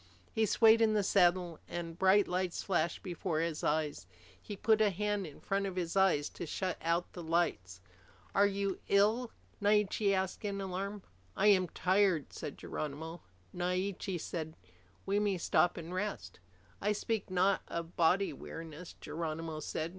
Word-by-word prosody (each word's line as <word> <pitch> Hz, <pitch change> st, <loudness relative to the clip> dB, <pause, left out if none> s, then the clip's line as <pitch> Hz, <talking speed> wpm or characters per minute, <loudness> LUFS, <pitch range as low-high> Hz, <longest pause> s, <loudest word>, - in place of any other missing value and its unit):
He 220 Hz, -1 st, +1 dB
swayed 225 Hz, +2 st, +6 dB
in 220 Hz, -1 st, +4 dB
the 205 Hz, -, +2 dB
saddle, 175 Hz, -3 st, +3 dB
and 170 Hz, -1 st, -5 dB
bright 190 Hz, +2 st, +5 dB
lights 180 Hz, -1 st, -1 dB
flashed 170 Hz, -3 st, 0 dB
before 175 Hz, -3 st, -2 dB
his 165 Hz, -1 st, -2 dB
eyes. 150 Hz, -, -1 dB, 0.3 s
He 205 Hz, -, -7 dB
put 220 Hz, +2 st, +3 dB
a 215 Hz, -, +5 dB
hand 205 Hz, 0 st, -1 dB
in 150 Hz, -, -12 dB
front 195 Hz, 0 st, -1 dB
of 190 Hz, -, -5 dB
his 175 Hz, -1 st, -2 dB
eyes 190 Hz, -7 st, +3 dB
to 175 Hz, -, -7 dB
shut 185 Hz, +2 st, -2 dB
out 170 Hz, +1 st, 0 dB
the 175 Hz, -, -7 dB
lights. 160 Hz, -, -1 dB, 0.5 s
"Are 200 Hz, +1 st, +5 dB
you 200 Hz, -1 st, -2 dB
ill?" 220 Hz, +5 st, +3 dB, 0.3 s
Naiche 205 Hz, 0 st, +3 dB
asked 190 Hz, +1 st, -1 dB
in 200 Hz, -1 st, -2 dB
alarm. 195 Hz, +1 st, -4 dB, 0.3 s
"I 210 Hz, -, +5 dB
am 185 Hz, -3 st, +5 dB
tired," 185 Hz, -5 st, +2 dB
said 145 Hz, -, -6 dB
Geronimo. 160 Hz, +3 st, -5 dB, 0.3 s
Naiche 180 Hz, +1 st, -2 dB
said, 160 Hz, -1 st, -5 dB, 0.5 s
"We 200 Hz, +1 st, +1 dB
may 205 Hz, -2 st, +1 dB
stop 175 Hz, 0 st, +2 dB
and 170 Hz, +1 st, -6 dB
rest." 205 Hz, +3 st, -4 dB, 0.4 s
"I 210 Hz, +1 st, +2 dB
speak 215 Hz, -1 st, -2 dB
not 185 Hz, +1 st, +2 dB
of 170 Hz, 0 st, -5 dB
body 180 Hz, +4 st, +3 dB
weariness," 165 Hz, +1 st, -9 dB
Geronimo 160 Hz, 0 st, -4 dB
said. 155 Hz, +1 st, -3 dB
185 Hz, 160 wpm, -33 LUFS, 165-200 Hz, 0.5 s, swayed